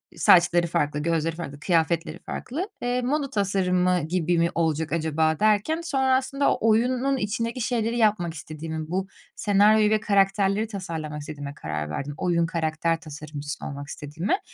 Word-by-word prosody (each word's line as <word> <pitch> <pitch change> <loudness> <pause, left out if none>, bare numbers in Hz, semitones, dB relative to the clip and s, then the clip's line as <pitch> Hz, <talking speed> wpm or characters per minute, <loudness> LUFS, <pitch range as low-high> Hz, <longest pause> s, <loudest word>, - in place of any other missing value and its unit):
saçları 175 -1 +5
farklı, 150 -3 0
gözleri 165 +1 0
farklı, 145 -4 -7
kıyafetleri 165 0 0
farklı. 340 - -4
Eee, 245 +1 0
moda 275 +3 -1
tasarımı 185 -5 +1
gibi 175 0 +1
mi 170 0 +3
olacak 160 -1 0
acaba 160 -1 +1
derken 215 +10 +2
sonra 265 -5 +2
aslında 275 +2 +1
oyunun 250 +5 +2
içindeki 230 +2 -2
şeyleri 230 0 0
yapmak 205 -7 +2
istediğimi, 155 0 -6
bu 190 +2 -1 0.3
senaryoyu 210 0 +4
ve 215 0 +3
karakterleri 200 +1 +2
tasarlamak 165 -7 -5
istediğime 145 -1 -7
karar 75 - -4
verdim, 140 - -4
oyun 170 -1 +1
karakter 165 0 -1
tasarımcısı 150 -1 -7
olmak 140 -1 -6
istediğime. 160 - -2
175 Hz, 140 wpm, -25 LUFS, 160-215 Hz, 0.3 s, saçları